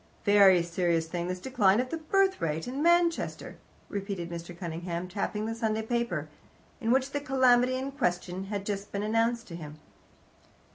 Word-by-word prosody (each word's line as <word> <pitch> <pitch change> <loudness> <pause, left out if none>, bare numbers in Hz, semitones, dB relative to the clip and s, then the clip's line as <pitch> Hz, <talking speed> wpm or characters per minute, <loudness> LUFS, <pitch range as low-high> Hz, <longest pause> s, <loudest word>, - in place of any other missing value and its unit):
"Very 195 -4 +6
serious 170 -1 0
thing 170 +1 -4
this 180 0 -3
decline 210 -3 +3
of 255 0 -2
the 330 - -1
birth 385 +4 +1
rate 160 +3 -2
in 265 +3 -3
Manchester," 340 0 +1 0.3
repeated 195 -4 -4
Mr. 170 0 -7
Cunningham, 175 0 -4
tapping 210 +2 -3
the 225 - -2
Sunday 220 -1 -1
paper, 235 +1 -1 0.5
in 230 -3 -2
which 265 +2 +2
the 285 - -2
calamity 255 -2 +3
in 265 +2 -3
question 185 -7 -2
had 200 0 -4
just 205 0 -4
been 200 0 -2
announced 230 +2 0
to 170 - -7
him. 150 -3 -8
210 Hz, 170 wpm, -29 LUFS, 175-255 Hz, 0.5 s, Very